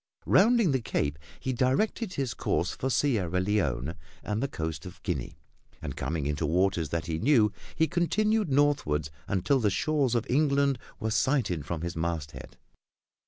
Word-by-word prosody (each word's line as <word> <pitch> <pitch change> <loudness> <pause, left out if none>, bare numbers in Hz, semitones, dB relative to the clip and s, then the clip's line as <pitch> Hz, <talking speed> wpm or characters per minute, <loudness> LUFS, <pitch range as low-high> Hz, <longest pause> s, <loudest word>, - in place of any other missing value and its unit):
Rounding 225 -3 +5
the 130 -2 +1
Cape, 75 -8 -1 0.2
he 130 - -2
directed 180 - 0
his 135 -5 -1
course - - -1
for 130 - -3
Sierra 105 - +1
Leone 85 - 0 0.3
and 105 +2 -2
the 140 - 0
Coast 80 - -4
of 90 - -11
Guinea, - - -3 0.4
and, - - -6
coming 75 0 -2
into 75 +2 -1
waters 85 -1 +1
that 85 +1 -2
he 80 -2 -2
knew, 115 - +4 0.2
he 160 - +3
continued 210 +4 +1
northward 130 - +2 0.2
until 100 +8 +1
the 110 -4 +2
shores 135 +3 +1
of 120 - +1
England 140 -1 +2 0.2
were 110 -2 -2
sighted 100 - +1
from 85 -2 -3
his 85 0 -4
masthead. 80 -5 -4
110 Hz, 160 wpm, -28 LUFS, -, 0.4 s, Rounding